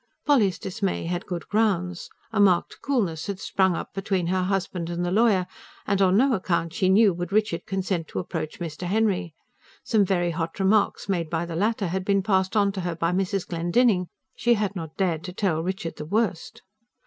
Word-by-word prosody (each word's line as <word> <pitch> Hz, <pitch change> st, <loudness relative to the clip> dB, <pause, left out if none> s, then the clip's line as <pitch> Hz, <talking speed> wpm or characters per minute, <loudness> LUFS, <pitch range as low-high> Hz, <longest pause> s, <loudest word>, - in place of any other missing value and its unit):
Polly's 225 Hz, -11 st, +3 dB
dismay 190 Hz, -1 st, -3 dB
had 175 Hz, +1 st, -3 dB
good 175 Hz, -3 st, -5 dB
grounds. 185 Hz, -5 st, 0 dB, 0.2 s
A 220 Hz, -, -1 dB
marked 190 Hz, -4 st, +3 dB
coolness 200 Hz, -, -1 dB
had 200 Hz, -2 st, -4 dB
sprung 190 Hz, -3 st, +1 dB
up -, -, -6 dB
between 195 Hz, -2 st, -1 dB
her 185 Hz, +2 st, +1 dB
husband 185 Hz, -2 st, -2 dB
and 175 Hz, +1 st, -2 dB
the 175 Hz, -, -1 dB
lawyer; 205 Hz, -3 st, +3 dB, 0.4 s
and 200 Hz, -1 st, +1 dB
on 190 Hz, 0 st, +4 dB
no 265 Hz, +3 st, +4 dB
account, 170 Hz, -4 st, -1 dB
she 185 Hz, -, +1 dB
knew, 200 Hz, 0 st, +5 dB
would 175 Hz, +1 st, -5 dB
Richard 210 Hz, -5 st, 0 dB
consent 190 Hz, -4 st, -2 dB
to -, -, -8 dB
approach 160 Hz, -3 st, -4 dB
Mr. 170 Hz, +1 st, -5 dB
Henry. 195 Hz, -5 st, 0 dB, 0.5 s
Some 215 Hz, -3 st, +3 dB
very 175 Hz, -2 st, +1 dB
hot 165 Hz, +2 st, -4 dB
remarks 200 Hz, +2 st, +2 dB
made 175 Hz, -5 st, -1 dB
by 165 Hz, +1 st, -1 dB
the 170 Hz, -1 st, -6 dB
latter 205 Hz, +1 st, 0 dB
had 190 Hz, +2 st, -2 dB
been 195 Hz, 0 st, +1 dB
passed 190 Hz, 0 st, +1 dB
on 200 Hz, -1 st, +3 dB
to 195 Hz, -1 st, -4 dB
her 175 Hz, -1 st, -3 dB
by 165 Hz, +1 st, 0 dB
Mrs. 195 Hz, +1 st, -1 dB
Glendinning. 180 Hz, +3 st, +2 dB, 0.3 s
She 240 Hz, 0 st, +3 dB
had 205 Hz, -2 st, -2 dB
not 160 Hz, -3 st, -7 dB
dared 170 Hz, -5 st, 0 dB
to 180 Hz, -, -6 dB
tell 180 Hz, -5 st, 0 dB
Richard 185 Hz, 0 st, -4 dB
the 150 Hz, -, -6 dB
worst. 200 Hz, 0 st, -2 dB
185 Hz, 195 wpm, -25 LUFS, 170-200 Hz, 0.5 s, knew